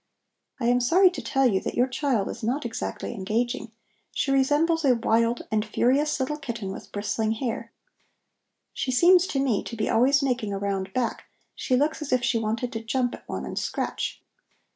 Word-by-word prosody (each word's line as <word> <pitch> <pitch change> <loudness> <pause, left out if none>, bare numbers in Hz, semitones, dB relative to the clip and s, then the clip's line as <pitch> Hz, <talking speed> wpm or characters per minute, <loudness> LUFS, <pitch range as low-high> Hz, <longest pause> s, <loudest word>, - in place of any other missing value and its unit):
I 235 - -2
am 245 +1 +4
sorry 355 +10 +5
to 360 - -6
tell 270 0 +1
you 200 -6 +3
that - - -4
your 245 - +4
child 255 -5 0
is - - -6
not 245 +5 -1
exactly 235 +1 -4
engaging; 230 +4 -2 0.4
she 275 - -1
resembles 295 +5 +2
a 260 -3 +4
wild 230 0 +1
and 215 -1 +2
furious 270 +7 +1
little 295 +3 -2
kitten 230 -8 -5
with - - -9
bristling 215 +2 -1
hair. 230 0 -4 1.0
She - - -3
seems 350 +8 +5
to 275 - -1
me 255 -7 +1
to 235 - -7
be 215 - -1
always 275 +4 +4
making 245 -6 -1
a - - -2
round 195 -1 -2
back; 250 -2 -2 0.3
she 255 - 0
looks 295 +5 +1
as 300 - -5
if 255 -1 +2
she 240 -1 +2
wanted 225 +3 -2
to 225 0 -4
jump 245 +2 0
at - - -11
one - - -4
and - - -3
scratch." - - -3
245 Hz, 190 wpm, -26 LUFS, 225-275 Hz, 1.0 s, sorry